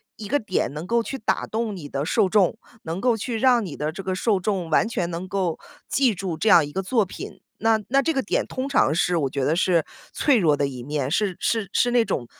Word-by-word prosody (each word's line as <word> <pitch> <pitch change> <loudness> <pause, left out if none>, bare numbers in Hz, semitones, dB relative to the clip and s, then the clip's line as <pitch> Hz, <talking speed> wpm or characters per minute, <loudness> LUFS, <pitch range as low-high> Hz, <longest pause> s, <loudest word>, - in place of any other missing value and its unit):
一 210 -1 -8
个 290 - +2
点， 195 - -2
能 155 +4 -6
够 235 +1 +2
去 270 - -5
打 225 - -1
动 220 -2 -3
你 150 -6 -8
的 140 +1 -2
受 185 +2 +2
众， 200 +1 +3 0.3
能 165 +4 -4
够 245 -2 +2
去 225 +2 -3
让 245 -1 +3
你 155 -6 -7
的 150 +1 -2
这 190 - -7
个 185 0 -2
受 200 +1 +1
众， 185 -3 -2
完 160 - +3
全 175 -6 -2
能 170 +2 -5
够 185 -3 -2 0.3
记 255 -6 +2
住 175 -2 -4
这 225 - -2
样 170 -8 +7
一 145 - -9
个 190 - -2
作 220 +2 +1
品。 185 - -9 0.2
那 225 0 +4
那 275 +2 +4
这 325 +3 0
个 270 - +1
点 200 - -1
通 260 +2 -4
常 155 - +3
是 175 +1 +1
我 140 -4 0
觉 135 +1 -2
得 145 +4 +2
是 170 -1 +2 0.3
脆 285 -4 +3
弱 160 -8 +3
的 145 - 0
一 130 -3 -5
面， 140 +1 -3
是 195 +1 0
是 220 -5 0
是 245 - +2
那 240 -2 +3
种， 120 - -2
190 Hz, 270 characters per minute, -23 LUFS, 160-225 Hz, 0.3 s, 样